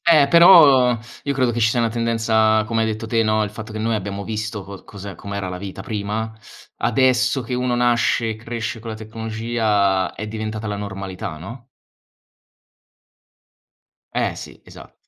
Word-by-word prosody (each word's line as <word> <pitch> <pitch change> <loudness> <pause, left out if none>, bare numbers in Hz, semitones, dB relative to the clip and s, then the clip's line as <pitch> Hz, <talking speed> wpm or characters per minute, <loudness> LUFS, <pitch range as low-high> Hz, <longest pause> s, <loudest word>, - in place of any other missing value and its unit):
Eh, 150 -4 +6
però 145 -8 +7 0.3
io 140 - -1
credo 130 -2 +2
che 120 - -3
ci 115 -1 +4
sia 120 +2 +1
una 115 - +2
tendenza, 115 -1 +2
come 115 0 0
hai - - +1
detto 110 0 -4
te, 115 0 +2
no 110 0 +2
il 105 - -2
fatto 110 +1 -9
che 110 - -5
noi 110 0 0
abbiamo 100 0 -5
visto 110 0 -4
co 100 0 -11
cos'è 100 -1 -9
com'era 100 -1 -5
la 90 0 -5
vita 95 0 -7
prima. 105 +2 -3 0.4
Adesso 130 0 +2
che 120 +2 -4
uno 125 0 0
nasce 120 -1 +2
e 110 - -4
cresce 115 0 -5
con 115 +1 -8
la 110 - -5
tecnologia 110 -3 -1
è 105 +1 -6
diventata 110 0 -4
la 105 - -3
normalità, 95 -5 -6
no? 120 - -10 2.5
Eh - - 0
sì, - - -10
esat - - -14
110 Hz, 170 wpm, -21 LUFS, 105-120 Hz, 2.5 s, però